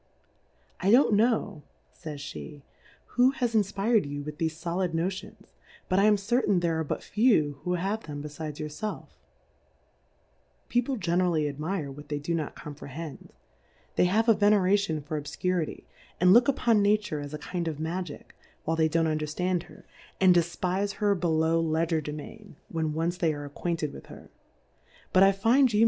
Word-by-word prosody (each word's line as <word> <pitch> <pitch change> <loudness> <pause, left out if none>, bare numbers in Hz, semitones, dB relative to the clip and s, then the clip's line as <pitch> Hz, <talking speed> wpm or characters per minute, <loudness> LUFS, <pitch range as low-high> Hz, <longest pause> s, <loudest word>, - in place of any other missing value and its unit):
I 185 - +1
don't 240 0 +6
know, 210 -5 +1 0.3
fays 150 -2 -7
flie, 145 -3 -9 0.4
who 250 +1 +3
has 240 -2 0
in 220 - +5
fpir'd 200 -1 +1
you 145 0 -5
with 150 0 -8
thefe 160 -1 -1
folid 175 0 -1
Notions, 185 +3 -4 0.4
but 185 - +3
I 200 - +5
am 210 -1 +5
certain 205 -1 +1
there 165 -2 0
are - - 0
but 150 - -4
few 180 - +2
who 180 - -1
'have 195 +5 -2
them 145 -1 -5
befides 150 0 -6
your 155 - -3
felf, 210 +8 -5 1.6
People 245 +2 0
ge 200 - -6
nerally 170 -3 +2
admire 150 +1 -3
what 145 +2 -11
they 145 - -1
do 145 +4 -3
not 160 -3 -3
com 150 -2 -8
prehend, 150 +2 -8 0.7
they - - +4
have 215 +6 +2
a 225 - +7
Veneration 200 -6 +2
for 150 0 -3
Obfcurity, 165 +3 -2 0.4
and 180 +1 +6
look 240 +2 +6
upon 235 -5 +3
Nature, 210 -5 +1
as 145 +1 -6
a - - -4
kind 170 +3 -4
of 155 -3 -3
Magick, 165 0 -5 0.3
while 160 - 0
they 160 -1 +2
don't 165 +1 +2
un 155 -1 0
derftand 175 +4 -1
her, - - -16 0.3
and 185 -2 +6
defpife 180 +3 0
her 205 0 +2
below 165 -2 +1
Le 160 0 +1
gerdemain, 160 +6 -5
when 160 -2 -2
once 165 +3 -1
they 160 -4 +1
arc 145 -1 -7
ac - - -28
quainted 165 -4 -1
with - - -11
her; - - -13 0.8
but 185 - +5
I 195 0 +7
find 235 +7 +3
you. 210 - +1
170 Hz, 180 wpm, -28 LUFS, 155-200 Hz, 1.6 s, a